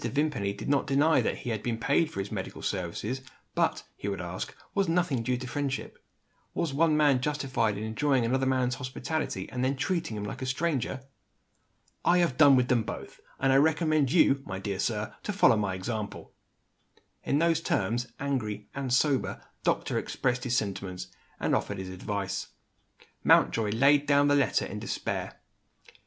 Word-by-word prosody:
Vimpany 140 Hz, -9 st, 0 dB
did 100 Hz, +2 st, -7 dB
not 140 Hz, 0 st, +2 dB
deny 145 Hz, +3 st, +4 dB
that -, -, -1 dB
he 120 Hz, -, -1 dB
had 110 Hz, -2 st, -2 dB
been 115 Hz, 0 st, -2 dB
paid 145 Hz, +7 st, +2 dB
for -, -, -6 dB
his 95 Hz, +1 st, -4 dB
medical -, -, -5 dB
services; 100 Hz, +7 st, -3 dB, 0.3 s
but, -, -, +1 dB
he -, -, -6 dB
would 100 Hz, -2 st, -2 dB
ask, 90 Hz, 0 st, -5 dB, 0.2 s
was 195 Hz, -4 st, +1 dB
nothing 165 Hz, -7 st, +1 dB
due 125 Hz, +2 st, 0 dB
to 130 Hz, -, -6 dB
friendship? 135 Hz, 0 st, -4 dB, 0.5 s
Was 160 Hz, -5 st, -1 dB
one 155 Hz, +1 st, +3 dB
man 145 Hz, -4 st, +4 dB
justified 130 Hz, -7 st, 0 dB
in 105 Hz, -, -4 dB
enjoying 125 Hz, +3 st, +1 dB
another 130 Hz, +3 st, +1 dB
man's 130 Hz, -1 st, +1 dB
hospitality, 130 Hz, -4 st, -3 dB
and 125 Hz, 0 st, -2 dB
then 135 Hz, +2 st, +1 dB
treating 150 Hz, -, -1 dB
him 105 Hz, -, -4 dB
like 105 Hz, -, -6 dB
a 130 Hz, -, -3 dB
stranger? 135 Hz, -2 st, -1 dB, 1.0 s
"I 175 Hz, -, +4 dB
have 170 Hz, -7 st, +2 dB
done 145 Hz, -2 st, +7 dB
with 125 Hz, -1 st, +3 dB
them 125 Hz, -2 st, +3 dB
both -, -, -7 dB, 0.2 s
and 135 Hz, 0 st, +3 dB
I -, -, +6 dB
recommend 155 Hz, -2 st, +3 dB
you, 140 Hz, -5 st, +4 dB
my 95 Hz, -6 st, -5 dB
dear 95 Hz, 0 st, -4 dB
sir, 105 Hz, 0 st, -1 dB
to -, -, -3 dB
follow 195 Hz, -, +5 dB
my 100 Hz, -3 st, -1 dB
example." 105 Hz, +2 st, -5 dB, 0.9 s
In 140 Hz, -, +1 dB
those 165 Hz, 0 st, +2 dB
terms 120 Hz, -3 st, 0 dB
the 120 Hz, +3 st, -11 dB
angry 110 Hz, -7 st, -2 dB
(and 135 Hz, -2 st, -3 dB
sober) 135 Hz, +1 st, +2 dB, 0.2 s
doctor -, -, +1 dB
expressed 125 Hz, -1 st, -1 dB
his 125 Hz, -1 st, +1 dB
sentiments, 95 Hz, -3 st, -3 dB, 0.3 s
and -, -, 0 dB
offered 100 Hz, -, 0 dB
his 95 Hz, 0 st, -5 dB
advice. 95 Hz, +1 st, -3 dB, 0.8 s
Mountjoy 110 Hz, -2 st, +4 dB
laid 140 Hz, +6 st, +4 dB
down 145 Hz, 0 st, +4 dB
the 145 Hz, -, +4 dB
letter 140 Hz, -2 st, +2 dB
in -, -, -6 dB
despair. -, -, -4 dB
130 Hz, 175 wpm, -28 LUFS, 105-145 Hz, 1.0 s, done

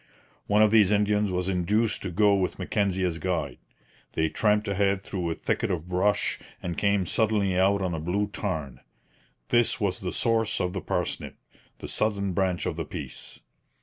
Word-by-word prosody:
One 105 Hz, +1 st, +4 dB
of 105 Hz, -, +4 dB
these 105 Hz, -4 st, +6 dB
Indians 105 Hz, -1 st, +2 dB
was 90 Hz, 0 st, -1 dB
induced 100 Hz, +4 st, +1 dB
to 95 Hz, -, -4 dB
go 105 Hz, +3 st, +3 dB
with 95 Hz, -2 st, 0 dB
Mackenzie 95 Hz, 0 st, 0 dB
as 85 Hz, -2 st, -1 dB
guide. 80 Hz, -8 st, -2 dB, 0.5 s
They 80 Hz, 0 st, +1 dB
tramped 105 Hz, +2 st, +1 dB
ahead 100 Hz, -1 st, +1 dB
through 90 Hz, -4 st, -3 dB
a 80 Hz, -, -2 dB
thicket -, -, -1 dB
of 90 Hz, -3 st, -3 dB
brush, 95 Hz, +3 st, +1 dB, 0.2 s
and 85 Hz, -1 st, -4 dB
came 100 Hz, -1 st, +1 dB
suddenly 105 Hz, -1 st, +1 dB
out 95 Hz, +2 st, +3 dB
on 90 Hz, -2 st, -1 dB
a 80 Hz, -, -2 dB
blue 90 Hz, +6 st, 0 dB
tarn. 80 Hz, -, -4 dB, 0.7 s
This 120 Hz, -1 st, +3 dB
was 100 Hz, -3 st, 0 dB
the 90 Hz, -2 st, -3 dB
source 115 Hz, -1 st, +1 dB
of 90 Hz, -1 st, -1 dB
the 95 Hz, -, -3 dB
Parsnip, -, -, -3 dB, 0.4 s
the -, -, -8 dB
southern 100 Hz, -3 st, 0 dB
branch 90 Hz, -1 st, 0 dB
of -, -, -2 dB
the -, -, -3 dB
Peace. -, -, -8 dB
95 Hz, 180 wpm, -26 LUFS, 90-105 Hz, 0.7 s, these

